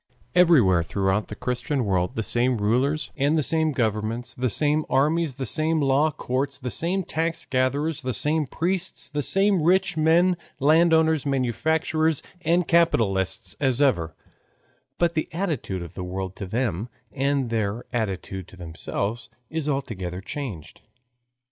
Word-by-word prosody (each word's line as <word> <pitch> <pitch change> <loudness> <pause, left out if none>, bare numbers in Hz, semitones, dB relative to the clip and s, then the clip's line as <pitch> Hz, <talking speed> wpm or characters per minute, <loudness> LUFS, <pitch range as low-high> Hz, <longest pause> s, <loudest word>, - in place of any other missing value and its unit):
Everywhere 145 - +5
throughout 95 +4 0
the - - -7
Christian 125 +1 -2
world 90 -3 0
the 110 - -1
same 120 +3 +1
rulers, 125 +9 0
and 145 +2 +2
the 155 - +2
same 160 +2 +2
governments, 115 0 -2
the 125 0 -1
same 150 +6 +1
armies, 150 +3 +2
the 130 +1 -5
same 155 +8 +2
law 140 +2 +3
courts, 135 -1 -3
the 125 -3 -5
same 185 - +1
tax 165 0 -2
gatherers, 140 +5 0
the 130 -1 -2
same 150 +2 0
priests, 185 +6 -1
the 150 -1 -2
same 195 +3 +3
rich 180 +1 +2
men, 170 +3 +4 0.2
landowners, 160 0 +4
manufacturers, 155 +4 0 0.2
and 175 +1 +2
capitalists, 100 - +2
as 130 -3 +1
ever, 85 - +1 0.8
but 170 -1 +1
the 155 -1 -2
attitude 155 - -2
of 85 - -10
the 90 - -6
world 95 +1 -5
to 100 - -5
them, 110 -1 -2 0.2
and 135 -3 0
their 110 0 -1
attitude 95 -4 -3
to 95 - -15
themselves 95 +6 -3 0.2
is 155 -2 -2
altogether 95 -10 -3
changed. 100 - -7
135 Hz, 145 wpm, -24 LUFS, 110-160 Hz, 0.8 s, Everywhere